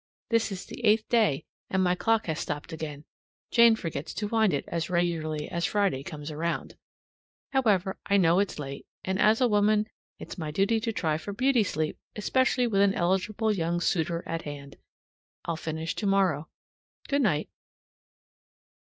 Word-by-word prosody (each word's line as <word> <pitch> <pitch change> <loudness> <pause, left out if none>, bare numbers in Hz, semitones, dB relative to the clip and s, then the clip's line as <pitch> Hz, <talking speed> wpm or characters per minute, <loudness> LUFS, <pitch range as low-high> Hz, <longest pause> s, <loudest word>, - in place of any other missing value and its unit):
(This 230 -2 +2
is 195 0 -5
the 245 - -9
eighth 215 0 +4
day, 210 - +2 0.2
and 190 -1 +1
my 180 -1 +3
clock 225 +4 +1
has 160 -2 -2
stopped 150 +3 -4
again; 150 -2 -6 0.5
Jane 235 -1 +7
forgets 165 -6 -5
to 205 +3 -2
wind 220 -2 +3
it 140 - -1
as 170 +1 -2
regularly 165 -4 -1
as 170 0 -3
Friday 200 -10 +1
comes 150 -1 -7
around.) 165 +2 -3 0.8
However, 205 -8 +1
I 200 - +4
know 175 -1 +4
it's 200 - -1
late; 140 -2 -7 0.2
and 190 0 -1
as 220 +3 +4
a 250 - +5
woman, 210 0 +3 0.3
it's - - -9
my 155 -2 -3
duty 195 +8 +2
to 225 +1 -2
try 160 -7 -1
for 205 - -6
beauty 255 +1 +3
sleep, 155 -5 -2 0.2
especially 255 +3 +2
with 200 -4 +2
an 200 -1 +4
eligible 200 +5 +1
young 170 -2 -1
suitor 170 -1 0
at 165 0 -3
hand. 140 -2 -8 0.7
I'll 170 - -1
finish 160 0 -3
tomorrow. 190 -7 +1 0.6
Good 280 0 +1
night. 155 - +1
185 Hz, 165 wpm, -28 LUFS, 160-215 Hz, 0.8 s, Jane